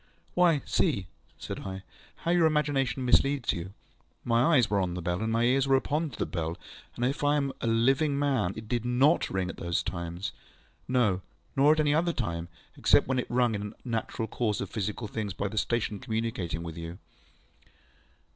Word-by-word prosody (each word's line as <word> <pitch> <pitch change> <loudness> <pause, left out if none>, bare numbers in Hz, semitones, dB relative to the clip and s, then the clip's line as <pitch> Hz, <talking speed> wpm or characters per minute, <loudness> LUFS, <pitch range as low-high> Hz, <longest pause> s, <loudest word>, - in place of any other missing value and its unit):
ŌĆØ - - -35 0.3
ŌĆ£Why, - - -21
see, 165 - +2
ŌĆØ 100 -6 -4 0.4
said - - -4
I, 95 0 -6 0.4
ŌĆ£how 170 - +3
your 175 -2 +4
imagination 135 -5 0
misleads 135 0 +3
you. 85 +2 -5 0.5
My 120 +7 +3
eyes 125 -4 +5
were 100 -2 +1
on 90 -2 -1
the 90 - -4
bell, 90 +3 -1
and 110 0 -1
my 115 +1 +2
ears 130 +3 +3
were 135 - +5
open 150 +4 0
to 125 - -11
the - - 0
bell, 85 -1 -3 0.4
and 120 - -1
if 140 +3 -1
I 145 +1 +4
am 140 -2 0
a - - -1
living 135 +6 +3
man, 130 -10 +1
it 110 0 -8
did 120 0 -1
NOT 130 +7 +3
ring 95 -1 -1
at - - -6
those 85 0 -1
times. 85 +2 -4 0.6
No, 110 -8 +2 0.3
nor 145 +3 +6
at 155 - -1
any 145 -1 +3
other 170 +2 +2
time, 85 - -3 0.3
except - - +4
when 130 -1 +1
it - - -3
was - - -3
rung 120 -2 +3
in 100 - -2
the - - -15
natural 115 -1 -2
course 110 -1 -1
of 100 - -4
physical 105 +1 -3
things 105 -2 -4
by 100 - -1
the 105 - -7
station 110 -3 -1
communicating 110 -7 -3
with 85 -1 -7
you. 85 +1 -6
115 Hz, 205 wpm, -29 LUFS, 95-135 Hz, 0.6 s, nor